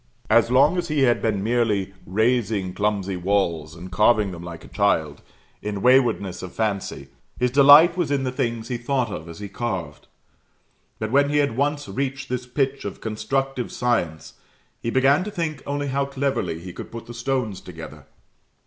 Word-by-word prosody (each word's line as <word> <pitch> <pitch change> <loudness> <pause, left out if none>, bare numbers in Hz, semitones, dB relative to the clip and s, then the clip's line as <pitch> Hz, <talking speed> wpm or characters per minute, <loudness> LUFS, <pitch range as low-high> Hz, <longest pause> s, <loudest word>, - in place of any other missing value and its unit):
As - - +5
long 140 +8 +4
as 175 - -3
he 150 -3 0
had 120 -2 +3
been 105 -3 0
merely 110 -4 0
raising 110 -2 +1
clumsy 100 -2 -1
walls 85 -5 -1
and 90 +2 -10
carving 105 +1 +3
them 85 -2 -8
like 85 -1 -9
a - - -12
child, 80 -8 0 0.4
in 105 -2 -4
waywardness 125 -7 +3
of 90 -1 -8
fancy, 105 -3 -2 0.3
his 125 0 +1
delight 145 +5 +8
was 175 -5 -1
in 140 -2 0
the 130 - -1
things 115 -4 -2
he 125 - -1
thought 120 -1 -1
of 80 -2 -6
as 85 - -9
he 105 - -6
carved; 100 -4 -5 0.9
but 110 0 -4
when 140 +2 +4
he 145 - +1
had 140 -5 +1
once 145 +2 0
reached 135 0 -3
this 125 0 -3
pitch 135 +1 -1
of 100 - -6
constructive 125 +4 -2
science, 100 -11 -1 0.5
he 115 - -2
began 135 +6 +3
to 210 - -5
think 165 -7 -3
only 145 0 -2
how 140 +1 0
cleverly 135 -12 -2
he 90 +1 -9
could - - -9
put 115 0 -8
the 120 - -9
stones 115 -4 -2
together. 80 -2 -10
115 Hz, 180 wpm, -23 LUFS, 100-135 Hz, 0.9 s, delight